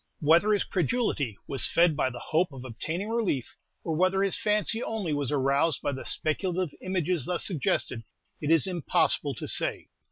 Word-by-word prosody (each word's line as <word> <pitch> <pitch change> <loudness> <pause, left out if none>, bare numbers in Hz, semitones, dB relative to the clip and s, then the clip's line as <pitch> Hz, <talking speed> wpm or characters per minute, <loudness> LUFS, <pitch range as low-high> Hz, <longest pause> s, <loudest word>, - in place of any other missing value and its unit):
Whether 170 +7 +4
his 205 - +2
credulity 160 - -1
was 135 - +3
fed 170 -2 +3
by 130 - +1
the 125 - -9
hope 160 +6 0
of 130 -1 -9
obtaining 160 - -4
relief, 165 - -1 0.3
or 160 - -2
whether 185 +3 +2
his 195 - +1
fancy 210 +2 +2
only 205 -10 -2
was 145 -3 -1
aroused 140 +2 +1
by 145 - 0
the 130 -1 -6
speculative 175 0 0
images 180 -5 -1
thus 180 -1 -1
suggested, 135 - -1 0.4
it 150 - -2
is 165 +1 +5
impossible 180 -6 0
to - - -6
say. - - 0
165 Hz, 170 wpm, -27 LUFS, 140-190 Hz, 0.4 s, is